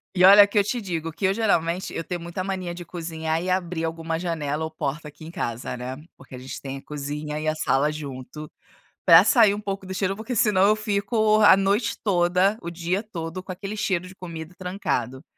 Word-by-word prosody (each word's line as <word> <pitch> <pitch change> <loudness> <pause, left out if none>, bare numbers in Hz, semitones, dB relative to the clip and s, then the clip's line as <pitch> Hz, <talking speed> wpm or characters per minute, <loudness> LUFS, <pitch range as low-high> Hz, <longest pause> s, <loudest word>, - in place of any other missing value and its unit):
E 180 - +3
olha 200 +2 +10
que 205 +1 +1
eu - - +4
te 240 +5 -2
digo 165 -6 -4
que 190 - -3
eu 190 - +3
geralmente, 185 -4 0
eu 165 - -4
tenho 175 0 -5
muita 170 +2 -5
mania 185 -2 -3
de 175 0 -8
cozinhar 160 -1 -3
e 185 - -3
abrir 180 -2 -1
alguma 165 0 -3
janela 160 -3 -2
ou 160 - -3
porta 150 0 -4
aqui 150 +2 -12
em 165 - -8
casa, 120 -6 -4
né, 125 +1 -6 0.2
porque 135 -1 -13
a - - -8
gente 130 +1 -8
tem 135 0 -6
a - - -12
cozinha 150 +1 -5
e 155 - -4
a 155 - +1
sala 150 -1 +1
junto, 150 0 -7 0.6
para - - +9
sair 220 -6 +5
um 210 - -6
pouco 195 -2 -4
do 190 - -6
cheiro, 195 +1 -1
porque 225 +3 -4
senão 200 -3 +3
eu 215 - +4
fico 215 +1 +1
a 205 -3 +8
noite 200 +4 +1
toda, 185 +1 +2
o 170 - -5
dia 175 +3 -2
todo 180 -4 -6
com 185 - -7
aquele 200 +3 -6
cheiro 185 -3 -1
de 180 - -11
comida 170 -2 -8
trancado. 140 - -3
175 Hz, 220 wpm, -24 LUFS, 155-195 Hz, 0.6 s, olha